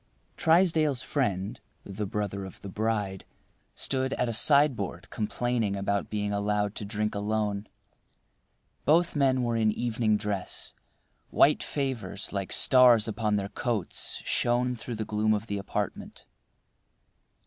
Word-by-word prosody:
Trysdale's 160 -5 +3
friend, 100 -9 -2 0.2
the 100 +1 -5
brother 100 -1 -3
of 95 - -10
the 100 - -7
bride, 105 -2 -2 0.5
stood 130 0 -1
at 125 - 0
a 115 - -2
sideboard 120 - +3
complaining 115 -1 -1
at 100 0 -1
being 105 -1 -2
allowed 105 0 0
to 105 - -4
drink 105 +1 -2
alone. 105 0 -2 1.2
Both 165 +4 +3
men 130 -3 +2
were 120 -1 0
in 110 -1 +2
evening 110 -1 0
dress. 105 -3 -4 0.6
White - - +4
favors 120 -11 -3
like 100 -2 -3
stars 125 -4 +6
upon 105 -1 -1
their 100 -1 -2
coats 110 -3 -2
shone 125 +1 +1
through 120 0 -6
the 110 0 -4
gloom 110 +1 +1
of 105 +1 -4
the 100 -2 -3
apartment. 100 - -5
110 Hz, 130 wpm, -28 LUFS, 100-125 Hz, 1.2 s, stars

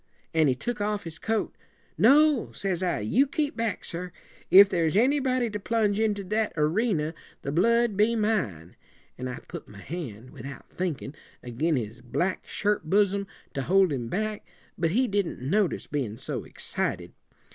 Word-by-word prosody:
An' 160 -2 +4
he 130 - +2
took 235 - -3
off 210 0 -1
his 165 -1 -8
coat. 225 -1 -1 0.4
'No,' 290 +2 +5
says 190 -3 -2
I, 180 - 0
'you 250 - +3
keep 295 +2 -1
back, 230 -3 -2
sir. 180 +1 -5 0.4
If 200 +2 +10
there's 170 -1 +1
anybody 255 0 +2
to 210 - -3
plunge 210 -1 +1
into 210 -2 +1
that 215 +3 -1
erena, 160 0 +1 0.3
the 140 - -2
blood 230 +6 +3
be 215 +4 +3
mine;' 175 - -1 0.4
an' 130 - -3
I 125 - -5
put - - -8
my 105 - -13
hand, 125 - -7
without 135 0 -10
thinkin', 165 -6 -3 0.3
ag'in 140 +7 0
his 115 -2 -4
black 175 +10 -2
shirt 210 -5 0
bosom, 200 0 +2 0.3
to 135 - -2
hold 185 +2 +3
him 120 -4 -3
back; 215 - -2 0.3
but 165 -1 +1
he 250 +9 +2
didn't 200 -4 -1
notice, 180 +9 0
bein' 125 -7 -3
so - - -5
excited. - - -3
195 Hz, 165 wpm, -27 LUFS, 150-220 Hz, 0.4 s, If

